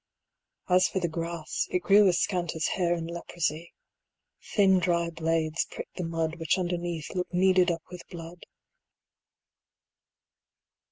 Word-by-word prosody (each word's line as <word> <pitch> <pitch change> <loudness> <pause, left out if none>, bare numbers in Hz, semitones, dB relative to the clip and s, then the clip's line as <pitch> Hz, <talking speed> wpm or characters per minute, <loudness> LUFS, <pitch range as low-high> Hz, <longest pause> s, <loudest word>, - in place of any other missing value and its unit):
As 180 0 +4
for - - -4
the 175 - 0
grass, 165 0 -3
it 180 - -1
grew 205 0 +6
as 175 -2 +3
scant 175 -4 -1
as 160 - 0
hair 175 -2 +1
In 165 -1 -4
leprosy; 170 -1 -3 0.8
thin 190 -3 +5
dry 170 -1 +1
blades 160 0 0
pricked - - -9
the 180 - -2
mud 165 -1 -2
Which 165 +1 +1
underneath 175 -3 -3
looked 180 0 -3
kneaded 185 0 +4
up 165 -1 -2
with 180 -1 -8
blood. 170 0 -10
170 Hz, 135 wpm, -28 LUFS, 165-180 Hz, 0.8 s, grew